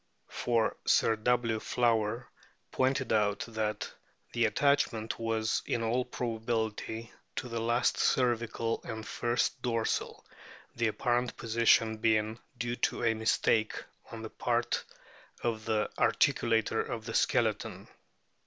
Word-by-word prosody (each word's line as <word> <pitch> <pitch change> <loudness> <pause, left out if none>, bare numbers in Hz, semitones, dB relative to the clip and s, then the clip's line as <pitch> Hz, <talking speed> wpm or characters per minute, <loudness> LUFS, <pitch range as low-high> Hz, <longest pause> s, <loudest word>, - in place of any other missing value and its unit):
For 115 -2 0
Sir 115 - +3
W. 115 0 +1
Flower 115 0 +1 0.4
pointed 130 -2 +1
out 105 -2 +2
that 110 -2 -3 0.4
the 115 -1 +3
attachment 115 -3 +1
was 115 -1 0
in 115 - 0
all 120 +3 +1
probability 115 -1 -3 0.2
to 145 - -3
the 115 -1 -3
last 120 +2 +1
cervical 115 -2 +1
and 110 0 -6
first 120 +2 0
dorsal, 115 -3 -1 0.5
the 120 -1 +1
apparent 120 +2 0
position 115 -1 +3
being 110 0 +1 0.2
due 120 0 -2
to - - 0
a 115 -1 +3
mistake 110 0 +2 0.4
on - - -7
the - - -7
part - - 0 0.6
of 110 -2 -1
the 110 -2 +1
articulator 115 -1 +2
of 110 -2 -5
the 115 - -5
skeleton. - - 0
115 Hz, 120 wpm, -31 LUFS, 110-120 Hz, 0.6 s, Sir